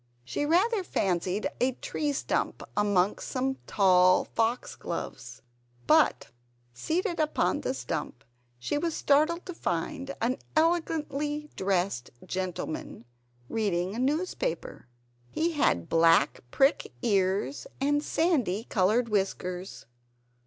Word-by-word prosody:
She 290 Hz, -, -2 dB
rather 390 Hz, +6 st, +3 dB
fancied 185 Hz, -, 0 dB
a 255 Hz, +1 st, +2 dB
tree 295 Hz, +4 st, -2 dB
stump 280 Hz, -, -1 dB
amongst 205 Hz, -2 st, +1 dB
some 265 Hz, +1 st, -1 dB
tall 185 Hz, -2 st, +5 dB
foxgloves. 170 Hz, -, -3 dB, 0.4 s
But 115 Hz, -, +3 dB, 0.4 s
seated 340 Hz, -, -1 dB
upon 305 Hz, -1 st, +1 dB
the 260 Hz, -, -2 dB
stump, 160 Hz, -, -4 dB, 0.3 s
she 210 Hz, -, -2 dB
was 330 Hz, 0 st, -1 dB
startled 310 Hz, +5 st, +2 dB
to 360 Hz, -, -6 dB
find 275 Hz, -, -3 dB
an 245 Hz, +3 st, 0 dB, 0.2 s
elegantly 300 Hz, -2 st, 0 dB
dressed 190 Hz, -9 st, 0 dB, 0.2 s
gentleman 180 Hz, -9 st, -4 dB, 0.4 s
reading 190 Hz, -, -1 dB
a 230 Hz, -, -4 dB
newspaper. 320 Hz, -, -2 dB, 0.4 s
He 330 Hz, -, 0 dB
had 280 Hz, -, +1 dB
black 165 Hz, -3 st, +4 dB
prick 270 Hz, -, +2 dB
ears 190 Hz, -, +1 dB
and 290 Hz, +2 st, +2 dB
sandy 260 Hz, -, +1 dB
colored 220 Hz, +3 st, +2 dB
whiskers. 190 Hz, -3 st, -2 dB
230 Hz, 105 wpm, -28 LUFS, 185-300 Hz, 0.4 s, tall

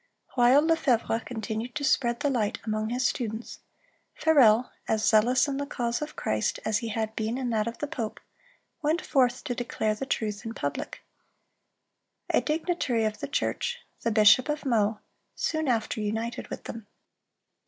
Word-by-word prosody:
(320) 245 Hz, -1 st, +5 dB
While 295 Hz, +3 st, +5 dB, 0.3 s
Lefevre 225 Hz, 0 st, -2 dB
continued 225 Hz, +1 st, -4 dB
to 300 Hz, -, -3 dB
spread 240 Hz, -4 st, +2 dB
the 285 Hz, -, +1 dB
light 220 Hz, -5 st, 0 dB
among 215 Hz, 0 st, -1 dB
his 250 Hz, +2 st, -1 dB
students, 225 Hz, -2 st, -3 dB, 0.6 s
Farel, 250 Hz, -7 st, +5 dB, 0.2 s
as 220 Hz, -1 st, +1 dB
zealous 240 Hz, +5 st, +4 dB
in 275 Hz, -1 st, -2 dB
the 285 Hz, 0 st, -3 dB
cause 240 Hz, -3 st, -2 dB
of 300 Hz, -, -5 dB
Christ 110 Hz, 0 st, -1 dB
as 215 Hz, -1 st, +1 dB
he 230 Hz, -, -4 dB
had 220 Hz, 0 st, -2 dB
been 225 Hz, +2 st, -1 dB
in 255 Hz, -2 st, -2 dB
that 220 Hz, -1 st, +1 dB
of 230 Hz, -, -4 dB
the -, -, -2 dB
pope, 255 Hz, -8 st, -4 dB, 0.6 s
went 315 Hz, +3 st, 0 dB
forth 255 Hz, -3 st, +2 dB
to 245 Hz, -, -2 dB
declare 230 Hz, -3 st, -1 dB
the 265 Hz, +5 st, -5 dB
truth 210 Hz, -4 st, -2 dB
in 225 Hz, 0 st, -6 dB
public. 145 Hz, -, -4 dB, 1.3 s
A -, -, +3 dB
dignitary 305 Hz, -7 st, 0 dB
of 215 Hz, 0 st, -2 dB
the -, -, -4 dB
church, 485 Hz, -, -1 dB, 0.2 s
the 230 Hz, -, 0 dB
bishop 215 Hz, +4 st, +6 dB
of 300 Hz, 0 st, -2 dB
Meaux, 220 Hz, -4 st, +2 dB, 0.4 s
soon 315 Hz, -2 st, -1 dB
after 225 Hz, -2 st, 0 dB
united 225 Hz, +3 st, -3 dB
with -, -, -7 dB
them. 225 Hz, -2 st, -8 dB
235 Hz, 170 wpm, -27 LUFS, 220-265 Hz, 1.3 s, bishop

